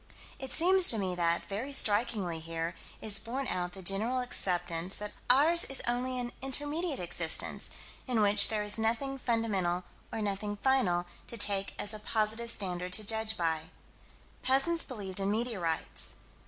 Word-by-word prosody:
It 265 -1 -4
seems 370 +2 +8
to 225 - +5
me 190 -3 -2
that, 170 -1 0
very 225 +8 -5
strikingly 205 -8 +1
here, 165 +1 -5 0.3
is 215 -1 +4
borne 260 +3 -5
out 180 0 -3
the 190 - -10
general 215 +8 +1
acceptance 180 -6 -1
that 210 0 -6 0.2
ours 310 +7 +6
is 270 - -3
only 250 +1 -1
an 245 -1 -4
intermediate 290 +4 -2
existence, 170 -2 0 0.4
in 245 -3 0
which 205 0 +6
there 215 -1 -2
is 210 +1 +1
nothing 255 +5 -2
fundamental, 200 -8 -1 0.3
or - - -4
nothing 205 +1 -3
final 200 -10 +2 0.2
to 235 - -7
take 200 -2 -2
as 205 - +1
a 215 - -7
positive 220 +2 -1
standard 180 -4 -2
to 215 - +3
judge 220 +1 +2
by. 160 -2 -2 0.7
Peasants 275 +6 +2
believed 200 -7 -6
in 195 0 -1
meteorites. 205 -7 -1
215 Hz, 155 wpm, -30 LUFS, 185-250 Hz, 0.7 s, seems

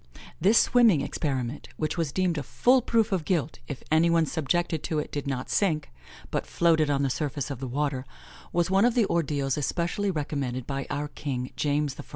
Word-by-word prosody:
This 200 +7 +4
swimming 225 - +5
experiment, 135 -3 -3
which 155 - -1
was 165 -5 -1
deemed 180 -2 0
a - - -3
full 250 - +3
proof 225 -2 +1
of 185 -4 0
guilt 165 -4 -1
if 140 - -6
any 160 +2 +4
one 165 -1 +3
subjected 160 +1 -1
to 160 - -1
it 150 - -3
did 145 -1 -4
not 130 -2 -3
sink, 160 - 0 0.4
but - - -2
floated 160 -3 +3
on 140 -1 +1
the 135 - +1
surface 145 -1 -3
of 135 - -5
the 130 - -4
water, 135 0 -1 0.5
was 175 +1 +1
one 195 +2 +4
of 240 0 +3
the 235 -4 +4
ordeals 145 -6 0
especially 170 +7 -1
recommended 140 -6 -2
by 135 -1 -4
our 145 +1 -2
king, 130 -3 -4
James 145 -1 0
I. - - -5
150 Hz, 195 wpm, -27 LUFS, 140-175 Hz, 0.5 s, swimming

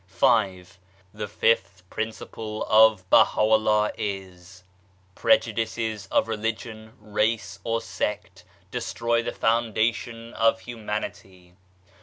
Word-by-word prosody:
V. 95 0 +2 0.5
The 105 0 -5
fifth 100 -3 0
principle 110 0 -5
of 110 -4 +5
Baha'u'llah 110 -1 +4
is: 95 -2 -6 0.5
Prejudices 110 -1 0
of 110 - +1
Religion, 110 0 -4
Race 105 +2 -1
or 115 0 -1
Sect 105 -3 -4 0.3
destroy 115 0 -1
the - - -3
foundation 115 +1 -1
of 115 0 +2
Humanity. 105 -6 -6
110 Hz, 90 wpm, -25 LUFS, 100-115 Hz, 0.5 s, of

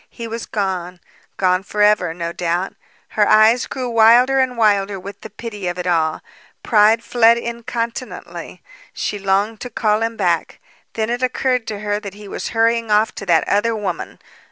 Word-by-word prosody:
He 235 -1 -8
was 230 0 -6
gone. 185 -3 -3 0.4
Gone 185 -1 +2
forever, 205 -3 +2
no 170 0 -5
doubt. 175 +2 -2 0.4
Her 210 -1 +2
eyes 220 +3 +5
grew 255 -2 -4
wilder 240 +3 +5
and 255 -2 0
wilder 200 -3 +2
with 200 +2 -10
the - - -9
pity 210 -2 -7
of 175 0 -3
it 180 - -4
all. 160 -3 0 0.4
Pride 220 +1 +4
fled 235 -1 +4
incontinently. 235 +1 -6 0.3
She 205 - -3
longed 200 +3 0
to 250 - -5
call 215 -2 0
him 225 0 -2
back. 175 -4 -1 0.3
Then 220 +1 -2
it 245 +1 -2
occurred 255 -1 0
to 210 -2 -5
her 205 0 -1
that 200 -2 -9
he 210 0 -11
was - - -5
hurrying 230 0 +1
off 215 +1 +3
to 195 - -8
that 165 -2 +3
other 225 +3 +1
woman. 195 -5 -4
210 Hz, 175 wpm, -19 LUFS, 195-230 Hz, 0.4 s, eyes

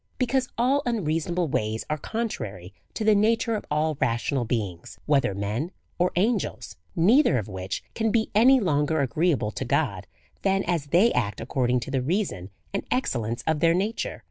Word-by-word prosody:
Because 255 0 0
all 260 +4 +3
unreasonable 170 -5 0
ways 110 -4 -2
are 150 - -1
contrary 110 - -4 0.2
to 220 - -2
the 215 0 +5
nature 225 +2 +2
of 215 - -3
all 150 0 0
rational 120 +2 0
beings, 100 -7 -4
whether 140 -9 +2
men 105 - -2 0.3
or 180 +1 +2
angels; 210 +3 -1 0.2
neither 200 - +4
of 110 - -3
which 95 -2 -5
can 225 0 0
be 220 0 +1
any 255 +5 +6
longer 155 -5 +1
agreeable 140 -3 +1
to - - -4
God 125 -8 -1 0.3
than 195 0 +1
as 170 -4 -1
they 185 +10 +4
act 105 -4 -1
according 125 0 0
to 125 - -6
the 135 -1 0
reason 130 - -2 0.2
and 200 - -1
excel 250 - 0
lence 115 +2 -4
of 160 -1 +1
their 165 +1 +4
nature. 205 +5 -2
155 Hz, 170 wpm, -25 LUFS, -, 0.3 s, any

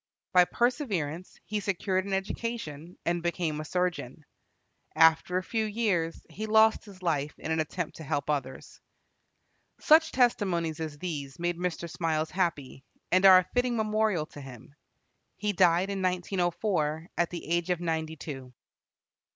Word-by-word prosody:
By 180 -1 +7
perseverance 190 - -1
he 210 0 -2
secured 190 -1 -1
an 195 - -3
education, 190 -5 -4
and 170 0 0
became 170 -3 -2
a - - -7
surgeon. 170 -5 -2 0.7
After 160 +2 +4
a 185 - -1
few 220 +3 -1
years 200 -7 -1
he 215 +1 -6
lost 220 +1 +4
his 190 -3 -14
life 150 -4 -1
in 160 - -5
an 160 - +1
attempt 160 +2 -3
to 160 - -8
help 145 -1 -2
others. 135 -3 -4 1.0
Such 320 0 +5
testimonies 185 -10 +1
as 155 -2 -5
these 145 -5 -5
made 175 0 -1
Mr. 175 -1 -2
Smiles 160 -2 -1
happy, 155 -8 -2 0.3
and 185 +2 +6
are 185 -1 +10
a 185 - +4
fitting 245 -1 +1
memorial 215 -6 +1
to 145 - -12
him. 130 0 -12 0.6
He 210 0 -1
died 180 +1 +3
in 195 -1 -3
1904, 175 -3 -1
at 175 - +1
the 175 - -7
age 170 +1 0
of 180 -2 +1
ninety 160 -2 -2
two. 135 -5 -8
175 Hz, 150 wpm, -28 LUFS, 160-195 Hz, 1.0 s, are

